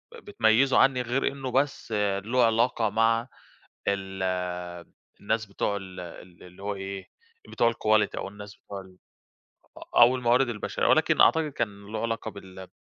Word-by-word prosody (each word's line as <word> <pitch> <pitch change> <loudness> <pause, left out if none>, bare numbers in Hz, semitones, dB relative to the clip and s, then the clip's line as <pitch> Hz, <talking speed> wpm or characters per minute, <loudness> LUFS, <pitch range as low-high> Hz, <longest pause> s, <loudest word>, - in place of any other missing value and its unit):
بتميّزه 135 - +2
عنّي 135 -1 +4
غير 125 +3 -1
إنه 135 -2 -4
بس 135 -2 -1 0.3
له 125 +2 +3
علاقة 115 0 +2
مع 115 +2 +2 0.6
ال 95 -1 -3 1.0
الناس 110 +2 -1
بتوع 100 0 -2
ال 95 -2 -9
ال 90 0 -11
اللي 90 +2 -14
هو 100 0 -2
إيه 95 0 -7 0.4
بتوع 120 0 +2
الquality 110 -2 +2
أو - - -3
الناس 105 0 -11
بتوع 100 -1 -9
ال 95 -1 -17 0.8
أ - - -11 0.2
أو 120 +2 +7
الموارد 125 +1 +2
البشرية 110 -3 -2
ولكن - - +4
أعتقد 160 -2 +4
كان 100 -5 -4
له 110 - -2
علاقة 115 -1 -3
بال 95 -1 -11
110 Hz, 150 wpm, -27 LUFS, 100-125 Hz, 1.0 s, أو